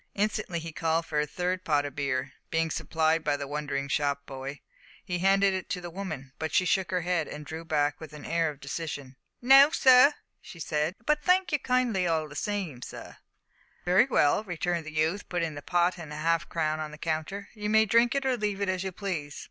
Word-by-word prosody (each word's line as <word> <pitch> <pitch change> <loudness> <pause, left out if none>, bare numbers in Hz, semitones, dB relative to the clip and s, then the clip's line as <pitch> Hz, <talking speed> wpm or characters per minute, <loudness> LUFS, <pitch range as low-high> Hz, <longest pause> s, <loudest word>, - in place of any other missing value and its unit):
Instantly 205 -3 -1
he 165 0 -5
called 165 +1 0
for 150 -2 -1
a 150 - 0
third 180 +3 -2
pot 145 -2 +1
of 145 -1 -6
beer. 140 -1 -2 0.2
Being 160 0 0
supplied 160 0 +1
by 145 -2 +1
the 140 - -4
wondering 145 -1 -3
shop 140 0 -1
boy, 135 +1 -7 0.4
he 180 -2 -2
handed 195 +1 +4
it 185 -1 -4
to 180 - -2
the 175 -1 -8
woman; 155 -8 -6
but 160 -1 -3
she 185 - +3
shook 190 -1 +1
her 180 0 0
head, 170 -2 0
and 150 0 -8
drew 160 +3 -6
back 145 -2 0
with 160 -1 -9
an 150 -1 -10
air 165 -1 +1
of 145 -2 -9
decision. 140 -2 -6 0.3
"No, 270 +3 +8
sir," 260 0 +6 0.3
she 170 - -12
said, 155 +2 -1
"but 300 0 +2
thank 365 +1 +3
you 295 - +2
kindly 250 -8 +1
all 160 -2 0
the 145 - -12
same, 185 - -3
sir." - - -9 0.7
"Very 180 +6 +5
well," 150 - +3
returned 175 -3 -2
the - - -6
youth, 160 +6 -1
putting 165 -3 -1
the 145 - -7
pot 175 +3 +1
and 155 -3 -8
a - - -6
half 165 +2 0
crown 155 -2 -1
on 155 -1 -4
the 150 - -11
counter, 165 +6 -3
"you 210 -1 -4
may 220 +1 +5
drink 235 +4 +3
it 275 -1 0
or 260 -1 +2
leave 210 -3 -2
it 200 -1 -1
as 185 0 -1
you 190 - -3
please. 170 -7 -4
165 Hz, 220 wpm, -28 LUFS, 150-195 Hz, 0.7 s, No